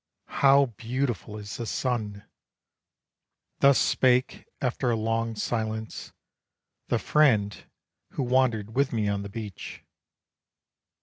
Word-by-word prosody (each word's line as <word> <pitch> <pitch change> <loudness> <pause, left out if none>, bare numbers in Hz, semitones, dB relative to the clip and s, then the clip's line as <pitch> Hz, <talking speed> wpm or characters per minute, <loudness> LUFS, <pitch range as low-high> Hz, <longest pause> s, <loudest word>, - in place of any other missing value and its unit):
"How 140 0 +6
beautiful 120 -1 -4
is 105 -1 -7
the 115 - -5
sun!" 110 -6 -3 1.3
Thus 140 -1 +6
spake 125 0 +2
after 125 0 -1
a 120 - +2
long 115 +1 -1
silence, 110 0 -4 0.8
the - - +1
friend 110 -10 +3 0.6
Who 135 - -2
wandered 120 -4 +1
with 140 +1 +2
me 110 -3 0
on 100 0 -1
the 100 - -7
beach. 105 -2 -8
115 Hz, 110 wpm, -26 LUFS, 105-130 Hz, 1.3 s, How